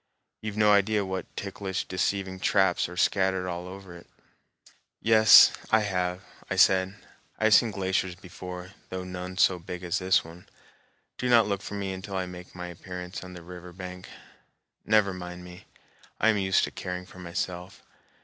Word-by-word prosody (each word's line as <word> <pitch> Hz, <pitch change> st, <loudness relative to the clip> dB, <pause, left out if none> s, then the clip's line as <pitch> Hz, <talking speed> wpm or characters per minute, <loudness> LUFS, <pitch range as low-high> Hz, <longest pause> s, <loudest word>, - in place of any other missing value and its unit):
You've 105 Hz, -1 st, -5 dB
no 105 Hz, -1 st, +5 dB
idea 100 Hz, 0 st, +3 dB
what 95 Hz, 0 st, -4 dB
ticklish 95 Hz, -1 st, -4 dB
deceiving 95 Hz, 0 st, -2 dB
traps 95 Hz, -3 st, +2 dB
are 90 Hz, -, -10 dB
scattered 95 Hz, -1 st, +1 dB
over 90 Hz, +1 st, -7 dB
it." 85 Hz, -, -14 dB, 0.9 s
"Yes, 110 Hz, -1 st, +8 dB, 0.2 s
I 110 Hz, -, +4 dB
have," 90 Hz, -2 st, -2 dB, 0.3 s
I 95 Hz, -, -1 dB
said. 95 Hz, +1 st, +4 dB, 0.4 s
"I -, -, -4 dB
have 110 Hz, 0 st, +5 dB
seen 115 Hz, -, +6 dB
glaciers 95 Hz, -2 st, -1 dB
before, 90 Hz, 0 st, -9 dB, 0.2 s
though 95 Hz, 0 st, -4 dB
none 90 Hz, 0 st, -7 dB
so 90 Hz, -1 st, +4 dB
big 90 Hz, +1 st, -7 dB
as 85 Hz, -2 st, -1 dB
this 95 Hz, -2 st, +2 dB
one. 85 Hz, +2 st, -13 dB, 0.7 s
Do 125 Hz, -, -1 dB
not 115 Hz, -3 st, +6 dB
look 100 Hz, -2 st, -2 dB
for 105 Hz, -, -7 dB
me 100 Hz, -1 st, -3 dB
until 95 Hz, +1 st, -7 dB
I 95 Hz, -1 st, -1 dB
make 90 Hz, 0 st, -11 dB
my 90 Hz, 0 st, -6 dB
appearance 90 Hz, +1 st, -7 dB
on 90 Hz, 0 st, -10 dB
the 90 Hz, -1 st, -10 dB
river 90 Hz, 0 st, -10 dB
bank. 90 Hz, 0 st, -9 dB, 0.8 s
Never 105 Hz, -3 st, +3 dB
mind 90 Hz, -1 st, -8 dB
me. 90 Hz, +2 st, -12 dB, 0.5 s
I -, -, +4 dB
am 110 Hz, -, +3 dB
used 95 Hz, -1 st, +2 dB
to -, -, -2 dB
caring 90 Hz, 0 st, -5 dB
for 95 Hz, -, -14 dB
myself." 90 Hz, +1 st, -5 dB
95 Hz, 170 wpm, -27 LUFS, 90-100 Hz, 0.9 s, Yes